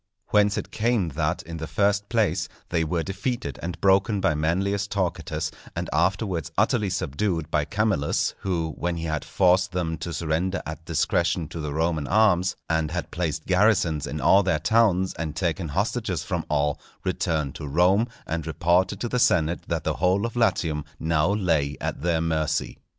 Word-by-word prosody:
Whence 105 Hz, -1 st, +3 dB
it -, -, -4 dB
came 110 Hz, -5 st, +1 dB
that, 80 Hz, +3 st, -1 dB
in 85 Hz, +1 st, -7 dB
the 80 Hz, 0 st, -5 dB
first 100 Hz, +2 st, +1 dB
place, 100 Hz, -7 st, +1 dB, 0.2 s
they 85 Hz, -2 st, +1 dB
were 80 Hz, +1 st, -1 dB
defeated 95 Hz, -, -3 dB
and 85 Hz, +1 st, -5 dB
broken 100 Hz, +2 st, +3 dB
by 85 Hz, -, +2 dB
Manlius 95 Hz, +7 st, 0 dB
Torquatus, 95 Hz, -4 st, -2 dB, 0.2 s
and -, -, -4 dB
afterwards 95 Hz, -2 st, 0 dB
utterly 105 Hz, -2 st, +2 dB
subdued 85 Hz, -1 st, -2 dB
by 75 Hz, -1 st, +1 dB
Camillus; 100 Hz, -7 st, 0 dB
who, 85 Hz, -4 st, -2 dB
when 85 Hz, 0 st, -1 dB
he 80 Hz, -, -4 dB
had 80 Hz, -2 st, -2 dB
forced 95 Hz, 0 st, +2 dB
them 80 Hz, -3 st, -2 dB
to 85 Hz, +2 st, -4 dB
surrender 85 Hz, +4 st, -1 dB
at 80 Hz, +1 st, -6 dB
discretion 85 Hz, +1 st, +1 dB
to 80 Hz, -, -6 dB
the 75 Hz, -2 st, -3 dB
Roman 80 Hz, -1 st, 0 dB
arms, 95 Hz, -3 st, +3 dB
and 80 Hz, -1 st, 0 dB
had 90 Hz, +1 st, -4 dB
placed 80 Hz, -2 st, -2 dB
garrisons 90 Hz, -6 st, +2 dB
in 75 Hz, -, -4 dB
all 85 Hz, +8 st, +5 dB
their 95 Hz, -5 st, +1 dB
towns, 95 Hz, +1 st, +2 dB
and 80 Hz, -1 st, -3 dB
taken 85 Hz, -1 st, -1 dB
hostages 100 Hz, +3 st, -1 dB
from -, -, -3 dB
all, 75 Hz, -1 st, 0 dB, 0.2 s
returned 75 Hz, -5 st, -1 dB
to 75 Hz, -, -7 dB
Rome 90 Hz, -, +3 dB, 0.2 s
and 80 Hz, 0 st, -3 dB
reported 90 Hz, +4 st, +1 dB
to 120 Hz, -, -1 dB
the 125 Hz, +1 st, -1 dB
senate 85 Hz, -6 st, +2 dB
that -, -, -2 dB
the -, -, -1 dB
whole 95 Hz, +4 st, +2 dB
of 115 Hz, -, -4 dB
Latium 80 Hz, -10 st, +1 dB, 0.2 s
now 80 Hz, +1 st, +1 dB
lay 80 Hz, -8 st, +1 dB
at -, -, -3 dB
their 85 Hz, 0 st, +1 dB
mercy. 80 Hz, -2 st, -1 dB
85 Hz, 175 wpm, -25 LUFS, 80-100 Hz, 0.2 s, all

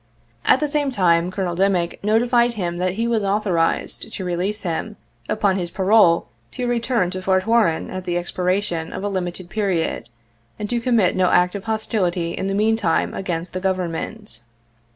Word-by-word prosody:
At -, -, +5 dB
the 300 Hz, -, 0 dB
same 290 Hz, -1 st, 0 dB
time, 175 Hz, -7 st, +2 dB
Colonel 185 Hz, -2 st, -2 dB
Dimick 185 Hz, -2 st, 0 dB
notified 235 Hz, +3 st, +3 dB
him 175 Hz, -5 st, -3 dB
that 180 Hz, 0 st, 0 dB
he 230 Hz, +4 st, -1 dB
was 230 Hz, -3 st, +1 dB
authorized 195 Hz, 0 st, 0 dB
to 190 Hz, -, -4 dB
release 180 Hz, +5 st, -2 dB
him 185 Hz, +4 st, -3 dB, 0.3 s
upon 200 Hz, -3 st, +1 dB
his 175 Hz, -1 st, -3 dB
parole 190 Hz, -2 st, +4 dB, 0.3 s
to 250 Hz, -, -3 dB
return 235 Hz, -5 st, 0 dB
to 185 Hz, 0 st, -5 dB
Fort 185 Hz, 0 st, +1 dB
Warren 225 Hz, -8 st, +2 dB
at 185 Hz, 0 st, -5 dB
the 175 Hz, -1 st, -1 dB
expi 175 Hz, +1 st, -3 dB
ration 180 Hz, -3 st, -1 dB
of -, -, -5 dB
a 205 Hz, -, -1 dB
limited 185 Hz, -2 st, -4 dB
period, 190 Hz, -, -1 dB, 0.5 s
and 210 Hz, -, -4 dB
to 240 Hz, -, +1 dB
commit 230 Hz, -7 st, +2 dB
no 185 Hz, -1 st, +3 dB
act 180 Hz, 0 st, +3 dB
of 200 Hz, 0 st, -6 dB
hostility 190 Hz, -6 st, -1 dB
in 190 Hz, -, -3 dB
the 195 Hz, -, -1 dB
meantime 215 Hz, -5 st, +1 dB
against 175 Hz, -2 st, -4 dB
the 185 Hz, -, -2 dB
Government. 185 Hz, -, -3 dB
190 Hz, 175 wpm, -21 LUFS, 175-220 Hz, 0.5 s, At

